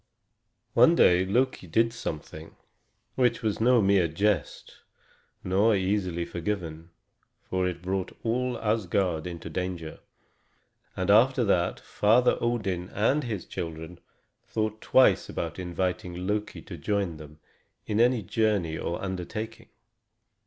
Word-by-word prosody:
One 125 +9 +6
day 90 - +5
Loki 120 0 0
did 115 +7 +2
something 80 -7 -7 0.6
which 120 -3 +1
was 110 -1 -1
no 120 -1 +5
mere 95 -3 +4
jest 90 -1 -1 0.7
nor 100 +4 +3
easily 95 -3 -1
forgiven, 85 -3 -4 0.5
for 95 0 -1
it 85 -1 -5
brought 95 0 -3
all 125 +1 -1
Asgard 95 -6 0
into 85 -2 -7
danger. 85 -1 -4 1.0
And 95 +2 +1
after 125 +4 +5
that 90 -4 +1
Father 120 +4 +2
Odin 100 -7 -1
and 130 +9 +1
his 105 -6 -4
children 80 +1 -6 0.4
thought 110 0 -3
twice 130 - +4
before - - -3
inviting 90 0 -3
Loki 105 +1 -3
to 90 - -9
join 95 -1 -1
them 75 0 -12 0.5
in 105 0 -1
any 120 -1 +3
journey 100 -6 0
or 85 - -3
undertaking. 100 +5 -5
95 Hz, 120 wpm, -27 LUFS, 85-110 Hz, 1.0 s, One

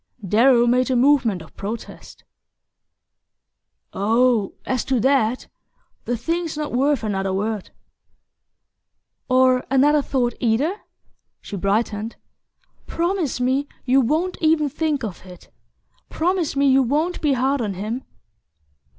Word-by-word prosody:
Darrow 235 +4 +4
made 250 +2 +2
a 260 - +1
movement 245 - +2
of 160 - -18
protest. 215 +4 -8 1.7
"Oh, 225 +1 +1
as 255 -1 -1
to 260 -2 0
that 255 -1 +1 0.6
the 245 - -1
thing's 330 +4 -3
not 300 -1 -3
worth 275 +1 +1
another 195 -2 -1
word." 205 +1 -3 1.6
"Or 255 0 +4
another 290 +3 +4
thought, 255 -3 -1
either?" 260 - +1 0.6
She 205 - -8
brightened. 210 +3 -1 0.7
"Promise 340 -6 -1
me 265 +3 0 0.2
you 265 +1 +4
won't 320 +9 0
even 310 -2 +2
think 300 -1 -2
of 205 -6 -6
it 180 -2 -14 0.6
promise 345 -2 -1
me 280 0 +2
you 270 0 +5
won't 300 +8 -1
be 295 -3 +2
hard 265 +1 0
on 205 -4 -3
him!" 220 +7 -4
255 Hz, 120 wpm, -21 LUFS, 225-290 Hz, 1.7 s, you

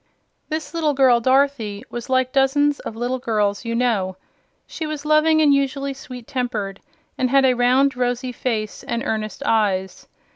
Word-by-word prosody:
This 315 +1 -4
little 310 -3 0
girl, 260 -3 +5
Dorothy, 255 -5 +1
was 240 0 -6
like 260 -1 +1
dozens 285 +2 +2
of 220 - -7
little 245 +3 -2
girls 210 -3 -1
you 230 0 -2
know. 210 -7 0 0.5
She 315 - -6
was 305 -1 -5
loving 310 +1 +4
and 290 -2 +5
usually 275 0 0
sweet 255 -3 -10
tempered, 230 -8 -3 0.4
and 255 - +1
had 270 +1 +4
a 255 - +4
round 255 +3 +3
rosy 250 0 -1
face 225 -3 -3
and 235 0 -3
earnest 215 +4 -3
eyes. 195 -6 0
255 Hz, 160 wpm, -21 LUFS, 225-275 Hz, 0.5 s, girl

